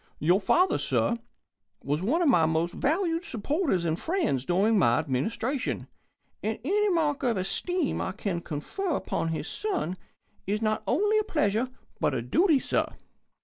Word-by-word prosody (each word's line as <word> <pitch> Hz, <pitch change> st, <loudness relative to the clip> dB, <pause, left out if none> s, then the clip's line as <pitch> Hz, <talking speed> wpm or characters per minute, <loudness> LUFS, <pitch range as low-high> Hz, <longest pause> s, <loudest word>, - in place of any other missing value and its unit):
Your 175 Hz, +7 st, +3 dB
father, 365 Hz, -, +3 dB
sir, 235 Hz, -, +1 dB, 0.6 s
was 145 Hz, +4 st, -1 dB
one 295 Hz, -, +1 dB
of -, -, +3 dB
my 170 Hz, -, +5 dB
most 165 Hz, +2 st, 0 dB
valued 330 Hz, +2 st, 0 dB
supporters 265 Hz, -, 0 dB
and 165 Hz, 0 st, 0 dB
friends 320 Hz, -, 0 dB
during 200 Hz, +5 st, +3 dB
My 120 Hz, -8 st, +4 dB
Administration, 225 Hz, -, -2 dB, 0.5 s
and 220 Hz, +1 st, -2 dB
any 415 Hz, +8 st, +2 dB
mark 310 Hz, -5 st, +1 dB
of 235 Hz, -4 st, +1 dB
esteem 310 Hz, -, -1 dB
I -, -, -2 dB
can 190 Hz, -3 st, -3 dB
confer 290 Hz, -, -3 dB
upon 165 Hz, -, -2 dB
his 165 Hz, -1 st, -3 dB
son 360 Hz, -, -2 dB, 0.5 s
is 205 Hz, +2 st, 0 dB
not 215 Hz, -1 st, 0 dB
only 420 Hz, -, +3 dB
a -, -, +1 dB
pleasure 235 Hz, -, 0 dB, 0.3 s
but -, -, +1 dB
a -, -, -2 dB
duty, 335 Hz, -4 st, +3 dB
sir." -, -, -1 dB
225 Hz, 155 wpm, -27 LUFS, -, 0.6 s, my